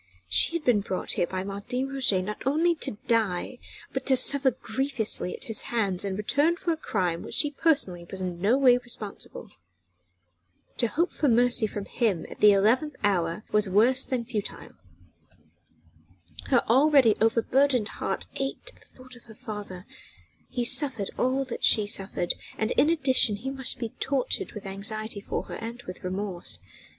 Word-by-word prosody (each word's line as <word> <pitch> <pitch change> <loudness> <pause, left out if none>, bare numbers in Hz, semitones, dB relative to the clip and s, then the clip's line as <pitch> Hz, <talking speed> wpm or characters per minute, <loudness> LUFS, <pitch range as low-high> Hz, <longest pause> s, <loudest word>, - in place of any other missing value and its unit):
She 95 - +4
had 335 - -2
been 240 -4 +4
brought 190 -2 -3
here 175 - 0
by 185 +1 -4
Martin 205 +7 -4
Roget 250 -9 +2
not 210 +2 -6
only 325 +5 +3
to 275 -9 -4
die, 225 0 0 0.3
but 265 - -2
to 265 - +5
suffer 270 +2 +5
grievously 240 -5 -1
at - - -5
his 225 -5 -3
hands 200 -6 0
in 195 -1 -3
return 285 - +1
for 350 - -1
a - - -3
crime 180 - -2
for - - -9
which - - -6
she 295 - +1
personally 275 - 0
was 190 - -5
in 180 -2 -4
no 220 +7 +3
way 250 -3 +5
responsible. 230 -5 -5 1.3
To 235 - +2
hope 335 +10 0
for 295 - 0
mercy 240 -1 +3
from 205 -1 -6
him 205 -9 -1
at - - -10
the 210 - +7
eleventh 235 +9 +2
hour 180 -1 0
were 210 - +4
worse 240 +7 +4
than 245 -3 -2
futile. 215 -4 -5 1.7
Her 250 -3 +3
already 265 -1 +5
overburdened 235 +1 +2
heart - - -3
ached 275 - -4
at - - -21
thought 255 0 -16
of 240 - -17
her 220 - -14
father: 205 -4 -8 0.6
he 245 -1 -2
suffered 255 -5 +2
all 265 +2 +1
that 255 - -7
she 215 - +4
suffered, 195 -3 -1 0.2
and 220 +2 -1
in 295 - +3
addition 265 -9 +3
he 255 +6 -5
must 265 -2 -2
be 230 - -4
tortured 270 -2 -1
with 210 -1 -8
anxiety 210 +2 -3
for - - -3
her - - -8
and 235 +2 -7
with 185 - -9
remorse. 185 - -3
230 Hz, 170 wpm, -26 LUFS, 200-265 Hz, 1.7 s, the